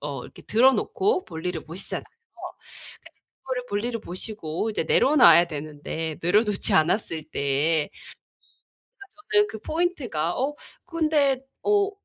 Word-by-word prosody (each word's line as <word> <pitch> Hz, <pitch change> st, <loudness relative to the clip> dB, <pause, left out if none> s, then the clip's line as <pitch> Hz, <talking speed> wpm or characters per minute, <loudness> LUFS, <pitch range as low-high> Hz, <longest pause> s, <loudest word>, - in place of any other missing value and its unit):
어 140 Hz, -3 st, -5 dB
이렇게 -, -, -13 dB
들어 250 Hz, +5 st, +4 dB
놓고 375 Hz, -, 0 dB
볼일을 165 Hz, 0 st, -5 dB
보시잖아요. 170 Hz, +5 st, -6 dB, 1.4 s
그거를 255 Hz, -2 st, -3 dB
볼일을 230 Hz, +3 st, -2 dB
보시고 185 Hz, 0 st, -4 dB
이제 210 Hz, -, -2 dB
내려놔야 245 Hz, -, +6 dB
되는데 155 Hz, +1 st, -5 dB
내려놓지 205 Hz, +4 st, +2 dB
않았을 160 Hz, -1 st, +1 dB
때 150 Hz, +1 st, 0 dB, 1.0 s
그러니까 395 Hz, -6 st, -16 dB, 0.3 s
저는 210 Hz, 0 st, +5 dB
그 220 Hz, -, -7 dB
포인트가 255 Hz, -, -1 dB
어 275 Hz, +3 st, -1 dB, 0.3 s
근데 305 Hz, -6 st, +1 dB, 0.2 s
어 410 Hz, -1 st, +2 dB
210 Hz, 285 characters per minute, -25 LUFS, 160-270 Hz, 1.4 s, 내려놔야